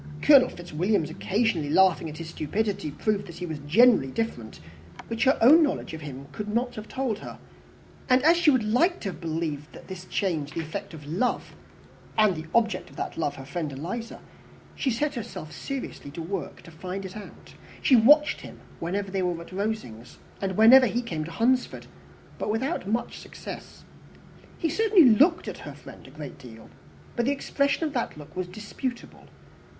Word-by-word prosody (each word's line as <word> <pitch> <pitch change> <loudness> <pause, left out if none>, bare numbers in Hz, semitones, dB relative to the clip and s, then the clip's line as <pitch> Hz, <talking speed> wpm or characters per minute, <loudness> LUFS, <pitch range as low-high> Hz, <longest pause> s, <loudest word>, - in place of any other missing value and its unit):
Colonel 270 -4 +7
Fitzwilliam's 175 0 -1
occasionally 190 -5 0
laughing 175 0 +4
at 155 - -9
his 165 -1 -7
stupidity 195 +2 -2
proved 205 +6 -1
that 170 - -10
he 180 - -4
was 160 -3 -5
generally 210 - +5
different, 130 - -4 0.5
which 230 +2 0
her 265 - +4
own 300 +8 +8
knowledge 290 - 0
of 160 - -7
him 140 -2 -8
could 205 +9 -6
not 240 +4 -1
have 215 0 -8
told 255 -6 -2
her; - - -9 0.7
and 255 +1 +4
as 330 +3 +6
she 340 -2 +4
would 260 -5 +3
have 215 +1 -1
liked 345 +8 +3
to 195 -3 -3
believe 160 -3 -3 0.2
this 185 -1 -8
change 160 -7 -2
the - - -3
effect 160 +1 -5
of 150 -2 -11
love, 180 +12 -1 0.6
and 215 -4 +4
the 160 0 -7
object 225 -2 +1
of - - -16
that - - -4
love 160 -3 -1
her 135 - -9
friend 155 +1 -4
Eliza, 185 - -5 0.5
she 270 - -1
set 290 +5 0
herself 220 - -7
seriously 275 - -6
to 160 +4 -7
work 195 +5 -5
to 165 - -13
find 185 +4 -6
it 185 - -8
out: 210 - -11 0.3
she 265 - +5
watched 295 +6 +5
him - - -11 0.2
whenever 195 +4 -3
they 195 -1 -1
were 175 -2 -1
at 170 - -11
Rosings, 185 - -4 0.2
and 190 -2 -2
whenever 250 +4 +8
he 240 +3 -1
came 160 -9 -4
to 165 - -8
Hunsford; 250 +8 +1 0.5
but - - -2
without 225 - -1
much 230 +4 -2
success. - - -10 0.7
He 330 - 0
certainly 390 0 +5
looked 290 +10 +4
at - - -6
her - - -9
friend - - -13
a - - -12
great - - -9
deal, - - -13 0.4
but 240 0 0
the - - +3
expression 280 +2 0
of 300 - -3
that 240 - -2
look 150 0 -12
was 185 -1 -3
disputable. 215 +6 -6
205 Hz, 185 wpm, -26 LUFS, 165-245 Hz, 0.7 s, own